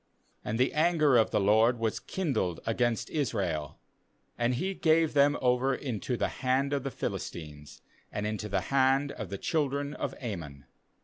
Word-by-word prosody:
7And 110 Hz, -, -2 dB
the 130 Hz, +2 st, +2 dB
anger 155 Hz, -3 st, +3 dB
of 115 Hz, -2 st, +4 dB
the -, -, +1 dB
LORD 110 Hz, +4 st, +4 dB
was 115 Hz, -1 st, -1 dB
kindled 130 Hz, -, -2 dB
against 115 Hz, 0 st, 0 dB
Israel, 95 Hz, -, -2 dB, 0.6 s
and 120 Hz, +1 st, +1 dB
He 190 Hz, +10 st, -1 dB
gave 160 Hz, -3 st, +2 dB
them 145 Hz, 0 st, +4 dB
over 125 Hz, +2 st, +2 dB
into 125 Hz, -1 st, -3 dB
the -, -, +1 dB
hand 135 Hz, +2 st, +1 dB
of 140 Hz, -, 0 dB
the 135 Hz, -, -3 dB
Philistines, 75 Hz, -, -6 dB, 0.3 s
and 105 Hz, -, -3 dB
into 105 Hz, 0 st, -3 dB
the 95 Hz, -1 st, 0 dB
hand 135 Hz, +1 st, +3 dB
of 105 Hz, -8 st, -7 dB
the 100 Hz, -, -4 dB
children 145 Hz, -, -1 dB
of -, -, -4 dB
Ammon. 80 Hz, -, -6 dB
125 Hz, 165 wpm, -29 LUFS, 105-140 Hz, 0.6 s, of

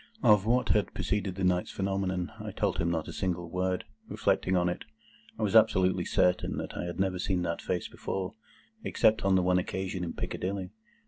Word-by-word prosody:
Of 105 Hz, -2 st, +5 dB
what 125 Hz, +2 st, +2 dB
had 105 Hz, -, +1 dB
preceded 100 Hz, -3 st, -1 dB
that 95 Hz, -, -3 dB
night's 90 Hz, -1 st, +2 dB
phenomenon, 95 Hz, -2 st, -1 dB
I -, -, -5 dB
told -, -, -1 dB
him 85 Hz, -, +1 dB
not 80 Hz, -2 st, -1 dB
a -, -, -6 dB
single 90 Hz, -2 st, -2 dB
word. 90 Hz, 0 st, -1 dB, 0.2 s
Reflecting 95 Hz, 0 st, +1 dB
on 90 Hz, 0 st, +2 dB
it, 90 Hz, -, -2 dB, 0.5 s
I 110 Hz, -, -2 dB
was 105 Hz, 0 st, 0 dB
absolutely 95 Hz, -5 st, +4 dB
certain 90 Hz, 0 st, +2 dB
that -, -, -5 dB
I -, -, -3 dB
had 85 Hz, +1 st, -5 dB
never 95 Hz, -1 st, 0 dB
seen 90 Hz, -1 st, 0 dB
that 85 Hz, -1 st, -2 dB
face 90 Hz, -2 st, -2 dB
before, 95 Hz, +1 st, -4 dB, 0.5 s
except 110 Hz, 0 st, +3 dB
on 95 Hz, 0 st, +3 dB
the 90 Hz, -, +3 dB
one 90 Hz, 0 st, +3 dB
occasion 95 Hz, 0 st, -3 dB
in 85 Hz, -, -3 dB
Piccadilly. 95 Hz, 0 st, -3 dB
95 Hz, 195 wpm, -29 LUFS, 90-95 Hz, 0.5 s, Of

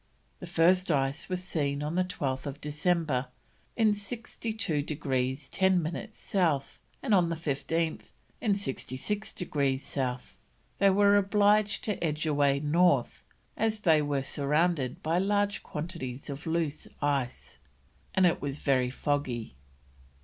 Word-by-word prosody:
The 180 Hz, -, -8 dB
first 180 Hz, +2 st, +3 dB
ice 140 Hz, +1 st, 0 dB
was 185 Hz, -1 st, -1 dB
seen 145 Hz, -5 st, -1 dB
on 150 Hz, +3 st, -2 dB
12th 145 Hz, -6 st, -2 dB
December 150 Hz, -3 st, 0 dB, 0.5 s
in 220 Hz, -2 st, +4 dB
62 215 Hz, -, -3 dB
degrees 135 Hz, -2 st, -2 dB
10 190 Hz, -1 st, +3 dB
minutes 170 Hz, +7 st, -5 dB
South, 160 Hz, -8 st, 0 dB, 0.2 s
and 245 Hz, -6 st, +1 dB
on 180 Hz, -4 st, +4 dB
the 165 Hz, -, -1 dB
15th, 160 Hz, +1 st, -2 dB, 0.3 s
in 210 Hz, -4 st, +2 dB
66 200 Hz, +3 st, -2 dB
degrees 140 Hz, -6 st, -1 dB
South, 130 Hz, -2 st, -3 dB, 0.4 s
they 200 Hz, -, +6 dB
were 200 Hz, +1 st, +5 dB
obliged 205 Hz, +1 st, +3 dB
to 210 Hz, -5 st, -2 dB
edge 155 Hz, -1 st, -1 dB
away 145 Hz, -2 st, +2 dB
north 170 Hz, +5 st, +2 dB, 0.3 s
as 220 Hz, -1 st, 0 dB
they 160 Hz, -6 st, +4 dB
were 145 Hz, -2 st, -1 dB
surrounded 145 Hz, -1 st, 0 dB
by 165 Hz, +3 st, +1 dB
large 205 Hz, +1 st, +1 dB
quantities 150 Hz, -5 st, -6 dB
of 140 Hz, +5 st, -7 dB
loose 160 Hz, -2 st, -1 dB
ice, 135 Hz, -, -2 dB, 0.6 s
and 190 Hz, -, +5 dB
it 175 Hz, -, +2 dB
was 145 Hz, 0 st, -3 dB
very 130 Hz, -4 st, +2 dB
foggy. 130 Hz, -, -2 dB
160 Hz, 130 wpm, -29 LUFS, 140-190 Hz, 0.6 s, they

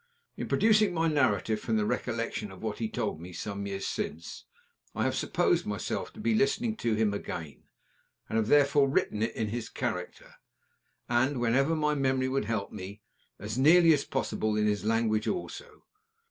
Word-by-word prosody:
In -, -, -5 dB
producing 215 Hz, -4 st, +3 dB
my 165 Hz, 0 st, +2 dB
narrative 120 Hz, -8 st, +1 dB
from 110 Hz, 0 st, -1 dB
the 105 Hz, -, +1 dB
recollection 115 Hz, -2 st, -2 dB
of 95 Hz, -, -12 dB
what 110 Hz, -2 st, -3 dB
he 110 Hz, -2 st, -2 dB
told 80 Hz, -, -3 dB
me 90 Hz, +1 st, -9 dB
some 100 Hz, +2 st, -5 dB
years 95 Hz, -1 st, -4 dB
since, 85 Hz, +1 st, -5 dB, 0.5 s
I -, -, 0 dB
have -, -, +1 dB
supposed -, -, +1 dB
myself 105 Hz, 0 st, -3 dB
to -, -, -13 dB
be 220 Hz, +1 st, +1 dB
listening 220 Hz, +2 st, +1 dB
to 115 Hz, -, 0 dB
him 110 Hz, -1 st, +1 dB
again, 80 Hz, -8 st, -6 dB, 0.6 s
and 110 Hz, -, -1 dB
have 110 Hz, -, 0 dB
therefore 140 Hz, 0 st, +4 dB
written 105 Hz, -5 st, 0 dB
in 110 Hz, -1 st, -1 dB
his 115 Hz, +1 st, -4 dB
character, -, -, -5 dB, 0.7 s
and, 125 Hz, +3 st, +1 dB
whenever 135 Hz, +7 st, +2 dB
my 150 Hz, -1 st, +1 dB
memory 130 Hz, -2 st, +1 dB
would 135 Hz, -4 st, 0 dB
help 110 Hz, -2 st, -2 dB
me, 100 Hz, +3 st, -8 dB, 0.3 s
as 110 Hz, +5 st, -4 dB
nearly 165 Hz, +4 st, +7 dB
as 145 Hz, -, +1 dB
possible 110 Hz, -5 st, -1 dB
in 105 Hz, -, +2 dB
his 105 Hz, -1 st, 0 dB
language 110 Hz, 0 st, +1 dB
also. 440 Hz, +4 st, -5 dB
115 Hz, 175 wpm, -29 LUFS, 105-145 Hz, 0.7 s, nearly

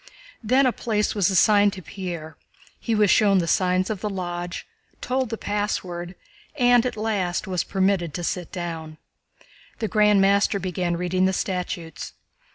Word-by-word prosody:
Then 255 Hz, +5 st, +3 dB
a 255 Hz, -, +3 dB
place 215 Hz, -3 st, -1 dB
was 200 Hz, -4 st, +2 dB
assigned 205 Hz, +1 st, +4 dB
to 185 Hz, -, -9 dB
Pierre, 170 Hz, -5 st, -6 dB, 0.4 s
he 230 Hz, -, -1 dB
was 210 Hz, -2 st, +4 dB
shown 200 Hz, -3 st, +4 dB
the 175 Hz, -, +1 dB
signs 185 Hz, +2 st, +2 dB
of 200 Hz, -3 st, -4 dB
the 210 Hz, -, -2 dB
Lodge, 175 Hz, -2 st, -5 dB, 0.3 s
told 255 Hz, -1 st, -1 dB
the 225 Hz, -, -4 dB
password, 185 Hz, -4 st, -3 dB, 0.4 s
and 245 Hz, -2 st, +4 dB
at 245 Hz, -, -5 dB
last 205 Hz, -5 st, -1 dB
was 185 Hz, -2 st, -1 dB
permitted 190 Hz, -3 st, 0 dB
to 175 Hz, -, -4 dB
sit 175 Hz, 0 st, -3 dB
down. 165 Hz, -4 st, -6 dB, 0.8 s
The 220 Hz, -, -2 dB
Grand 210 Hz, -1 st, +4 dB
Master 200 Hz, +1 st, +3 dB
began 180 Hz, -2 st, -2 dB
reading 185 Hz, +1 st, +1 dB
the 190 Hz, -, 0 dB
statutes. 175 Hz, -5 st, -4 dB
190 Hz, 160 wpm, -24 LUFS, 175-210 Hz, 0.8 s, assigned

